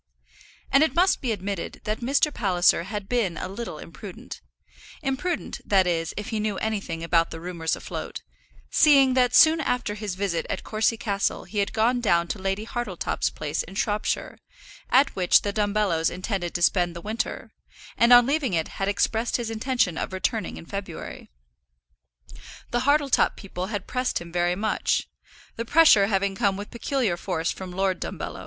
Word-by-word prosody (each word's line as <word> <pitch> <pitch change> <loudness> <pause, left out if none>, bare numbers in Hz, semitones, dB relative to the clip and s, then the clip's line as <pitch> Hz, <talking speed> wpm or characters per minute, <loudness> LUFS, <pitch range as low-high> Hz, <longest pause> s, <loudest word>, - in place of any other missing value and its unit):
And 275 - +5
it 315 - +2
must 365 +2 +3
be 250 - -1
admitted 200 -3 -4
that 215 0 -2
Mr. 280 +4 +1
Palliser 180 -4 +2
had 205 0 -5
been 210 -9 0
a - - -4
little 215 +5 -6
imprudent, - - -10 0.6
imprudent, 290 +5 -2
that 195 -2 +3
is, 165 -2 -1
if 210 +3 -4
he 220 -3 -2
knew 210 -2 -1
anything 200 -7 -3
about 165 0 +2
the 165 - -7
rumours 165 -2 -2
afloat, - - -7 0.5
seeing 275 -4 +5
that 250 -1 +3
soon 320 0 +7
after 250 -6 -1
his 210 -3 -5
visit 185 -4 -2
at - - -3
Courcy 220 +1 0
Castle 200 -3 -1
he 210 - -4
had 200 - 0
gone 235 +3 +1
down 170 -6 +2
to 210 - -3
Lady 195 +2 -2
Hartletop's 230 -7 -2
place 150 +1 -3
in 195 - -10
Shropshire, 210 +1 -2 0.5
at 275 +2 +4
which 180 -2 +4
the 205 - -2
Dumbellos 205 -6 +1
intended 185 -1 -4
to 175 - 0
spend 175 -1 +2
the 170 - -7
winter, 215 +4 -4 0.4
and 235 +1 +4
on 245 0 +9
leaving 275 - 0
it 160 -1 -3
had 195 - +1
expressed 225 +3 0
his 235 -2 -4
intention 225 -6 0
of - - -4
returning 205 +1 -2
in - - -10
February. 190 -3 -7 1.4
The 240 +1 0
Hartletop 285 -2 +3
people 185 -2 -6
had 205 -2 -4
pressed 255 0 -1
him 170 0 -10
very 175 0 +1
much, 210 +2 0 0.5
the 230 - -2
pressure 235 -7 +6
having 200 -1 0
come 195 -2 0
with 205 +1 -8
peculiar 235 -6 -1
force 170 -3 -2
from 190 -1 -7
Lord 190 0 -1
Dumbello. - - -5
205 Hz, 175 wpm, -25 LUFS, 180-240 Hz, 1.4 s, on